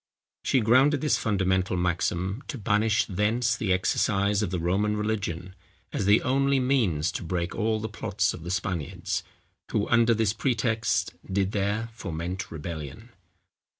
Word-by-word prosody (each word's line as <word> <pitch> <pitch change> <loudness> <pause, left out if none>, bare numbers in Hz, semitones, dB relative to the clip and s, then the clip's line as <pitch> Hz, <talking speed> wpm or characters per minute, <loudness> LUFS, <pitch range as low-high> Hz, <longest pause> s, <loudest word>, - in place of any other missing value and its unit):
She 130 - +2
grounded 130 +6 +4
this 150 - +2
fundamental 95 -3 +1
maxim, 90 +4 -1
to 140 - -5
banish 105 0 +2
thence 110 +5 +1
the 105 -4 -1
exercise 100 +2 +2
of 105 - -1
the 90 - -2
Roman 100 +5 0
religion, 100 -4 -2 0.4
as 100 - -1
the 105 +2 +5
only 135 +1 +2
means 110 - +1
to - - -5
break 85 0 -2
all 110 0 0
the 110 - -3
plots 105 -1 -1
of 90 - -8
the 85 - -7
Spaniards, 90 -3 -2 0.5
who 105 - 0
under 115 -1 +4
this 110 -2 +1
pretext, 110 -5 0 0.2
did 95 0 +1
there 105 +3 -1
foment 90 -3 -5
rebellion." 80 - -7
100 Hz, 150 wpm, -27 LUFS, 90-115 Hz, 0.5 s, the